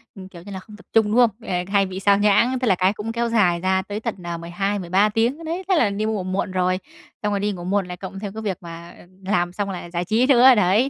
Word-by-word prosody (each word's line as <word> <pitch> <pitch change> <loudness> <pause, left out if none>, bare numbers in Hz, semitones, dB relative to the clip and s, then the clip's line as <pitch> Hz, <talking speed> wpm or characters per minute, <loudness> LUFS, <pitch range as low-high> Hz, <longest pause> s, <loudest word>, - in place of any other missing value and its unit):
ừ, 195 - -10
kiểu 170 -2 -11
như 200 +3 -11
là, 190 - -5
không 210 +2 -14
tập - - -18
trung, 225 -1 +5
đúng - - +1
không? 245 -2 +6 0.2
À, 180 -1 0
hay 200 0 +2
bị 190 0 -6
sao 200 0 +4
nhãng, 235 +5 +3
tức 255 - -1
là 190 - +4
cái 185 +3 +2
cũng 215 +2 -5
kéo 235 0 -1
dài 180 -7 +2
ra 190 +1 +1
tới 205 +2 -6
tận, 230 0 -4
ờ, 170 -1 -4
12-13 190 +3 0
tiếng 235 +9 0
đấy, 340 +4 -4
thế 375 - +4
là 235 -10 +3
đi 205 +2 -2
ngủ 215 -4 -1
muộn 185 +1 -2
rồi, 185 0 +1 0.5
xong 210 0 0
rồi 200 - 0
đi 205 +1 0
ngủ 175 -3 -7
muộn 190 0 0
lại 180 0 -7
cộng 190 +1 -8
theo 200 -2 -5
cái 220 +1 -7
việc 195 -5 -3
mà 170 0 -10 0.3
làm 175 -3 0
xong 200 0 -3
lại 175 -2 -7
giải 175 0 -2
trí 225 +6 +2
nữa, 255 -1 +7
đấy, 210 +7 +3
200 Hz, 280 wpm, -22 LUFS, 185-220 Hz, 0.5 s, nữa